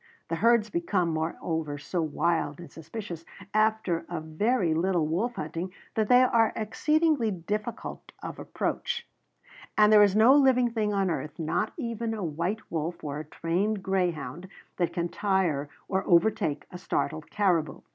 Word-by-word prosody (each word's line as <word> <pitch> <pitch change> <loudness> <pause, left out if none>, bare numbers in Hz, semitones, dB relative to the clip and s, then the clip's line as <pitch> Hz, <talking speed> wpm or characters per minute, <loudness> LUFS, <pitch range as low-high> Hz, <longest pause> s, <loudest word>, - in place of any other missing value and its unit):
The 165 - -1
herds 230 +1 +3
become, 205 - 0
moreover, 160 -1 -2
so 170 +4 -2
wild 155 -1 0
and 170 -5 -10
suspicious 165 +1 -7 0.3
after 215 -5 +2
a 175 -2 -3
very 170 +4 +1
little 170 0 +1
wolf 200 +11 -1
hunting 165 +3 -4 0.2
that 220 -1 +1
they 250 +2 +7
are 230 -3 +3
exceedingly 300 +4 +1
difficult 210 +5 -4
of - - -6
approach; - - -3 0.7
and 210 0 +6
there 210 - +8
is 205 -1 +5
no 225 +5 +7
living 255 -4 +4
thing 215 -2 0
on 195 -3 +1
earth, 150 0 -4
not 165 +6 -1
even 230 -5 -3
a 210 - -4
white 170 +7 -2
wolf 165 +1 -3
or 145 -1 -4
a 155 - -6
trained 190 +7 -1
greyhound, 175 -4 -1 0.3
that 175 -2 +1
can 170 0 -1
tire 180 -8 0 0.2
or 190 0 0
overtake 175 -4 +2
a 180 - -8
startled 155 -3 -2
caribou. 170 -8 +1
185 Hz, 155 wpm, -28 LUFS, 160-220 Hz, 0.7 s, there